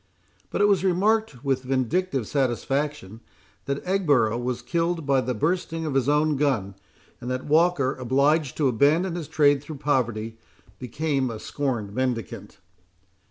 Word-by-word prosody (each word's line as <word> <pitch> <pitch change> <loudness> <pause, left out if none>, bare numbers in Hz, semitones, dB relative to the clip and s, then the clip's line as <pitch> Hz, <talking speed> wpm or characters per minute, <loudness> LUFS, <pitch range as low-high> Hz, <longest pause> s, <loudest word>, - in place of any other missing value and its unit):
But - - -2
it 205 - +5
was 200 -2 +2
remarked, 195 - +1
with 135 -2 0
vindictive 135 - -1
satisfaction, 135 -4 -2 0.5
that 140 0 -3
Egborough 145 - +2
was 125 0 -3
killed 170 -1 -1
by 135 -1 +3
the 125 -1 -3
bursting 165 - -1
of 150 - -2
his 135 0 +1
own 150 0 +2
gun; 125 -9 0 0.5
and 125 - -6
that 130 0 -3
Walker, 155 -3 +2
obliged 140 +3 +1
to 150 - +2
abandon 150 +9 +2
his 170 -4 -5
trade 145 -3 +3
through 145 +1 -8
poverty, 115 -6 -1 0.4
became 135 +1 -1
a 115 - -5
scorned 115 -5 -3
mendicant. 125 -4 -3
140 Hz, 145 wpm, -25 LUFS, 125-160 Hz, 0.5 s, it